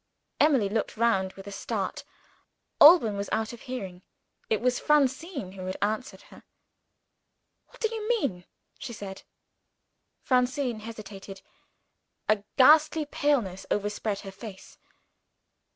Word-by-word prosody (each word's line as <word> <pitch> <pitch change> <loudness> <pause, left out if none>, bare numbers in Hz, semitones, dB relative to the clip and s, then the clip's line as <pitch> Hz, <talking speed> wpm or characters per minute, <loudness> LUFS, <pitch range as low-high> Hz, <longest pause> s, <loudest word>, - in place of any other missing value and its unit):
Emily 270 -9 +4
looked 215 +2 -2
round 195 -5 +1
with 195 - -12
a 200 - -8
start. - - -4 0.8
Alban 290 - +8
was 200 0 -4
out 220 +1 -1
of 235 - -11
hearing. 195 -9 -6 0.5
It 220 - +2
was 250 +1 +1
Francine 285 - +1
who 185 -1 -8
had 185 - -4
answered 215 +5 -2
her. - - -14 1.3
"What - - -20
do 445 -1 0
you 440 0 -4
mean?" 275 - 0 0.3
she 235 - -6
said. 195 -3 -8 1.0
Francine 250 -2 +1
hesitated. 205 -3 -9 0.8
A 215 -1 +2
ghastly 305 +3 +6
paleness 245 -11 -1
overspread 205 0 -2
her 195 - -8
face. 195 -1 -11
220 Hz, 120 wpm, -27 LUFS, 195-275 Hz, 1.3 s, Alban